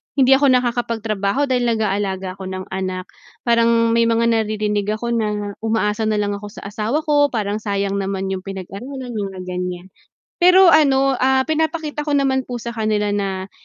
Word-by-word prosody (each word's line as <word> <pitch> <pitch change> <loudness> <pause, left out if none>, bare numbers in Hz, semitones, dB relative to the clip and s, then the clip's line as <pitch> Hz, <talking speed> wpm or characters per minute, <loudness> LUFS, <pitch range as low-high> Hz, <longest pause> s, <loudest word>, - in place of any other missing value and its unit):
hindi 270 -1 +4
ako 275 +1 +5
nakakapagtrabaho 235 -2 0
dahil 250 -3 +1
nag-aalaga 195 -3 -2
ako 190 - -6
ng 185 0 -5
anak, 185 -1 -3 0.4
parang 230 0 +3
may 230 0 +3
mga 230 0 +2
naririnig 210 -2 0
ako 235 +2 -4
na 210 -3 -1
umaasa 220 -1 0
na 215 - +1
lang 205 0 0
ako 205 +1 -8
sa - - -11
asawa 220 +9 -2
ko, 290 -2 +3
parang 210 -2 -2
sayang 200 -2 -2
naman 195 0 -2
'yung 190 - -2
pinag-aralan 230 +7 -7
mga 195 -3 -4
ganiyan. 180 0 -4 0.5
Pero 365 0 +7
ano, 275 -3 +4
ah, 265 0 +3
pinapakita 315 -1 -2
ko 295 - 0
naman 265 -2 +1
po 245 -2 -5
sa 235 - -4
kanila 215 -2 -1
na, 195 -1 -3
220 Hz, 165 wpm, -20 LUFS, 200-260 Hz, 0.5 s, Pero